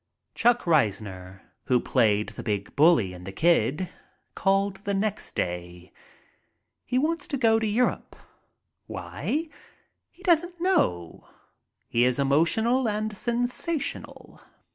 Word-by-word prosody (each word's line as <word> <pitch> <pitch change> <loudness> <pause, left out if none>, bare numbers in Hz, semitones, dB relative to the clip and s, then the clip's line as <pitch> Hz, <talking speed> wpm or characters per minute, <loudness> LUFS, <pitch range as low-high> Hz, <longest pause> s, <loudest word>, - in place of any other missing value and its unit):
Chuck 240 0 +2
Reisner, 100 - 0 0.2
who 125 -1 +3
played 110 -5 +1
the - - -8
big 105 -3 -3
bully 145 - +4
in 90 0 -11
"The 95 - -7
Kid," 160 - +2 0.5
called 195 0 +1
the 200 0 -3
next 205 +1 -2
day. 90 0 -4 0.9
He 250 - -1
wants 325 +5 0
to 280 - -2
go 225 -3 +3
to 220 - -1
Europe. 235 +4 0 0.7
Why? 320 +3 -3 0.6
He 370 - -21
doesn't 350 -1 +2
know. 90 - 0 0.6
He 120 - +2
is 125 0 +2
emotional 220 - +2
and 215 0 -2
sensational. 245 - -3
185 Hz, 120 wpm, -26 LUFS, -, 0.9 s, bully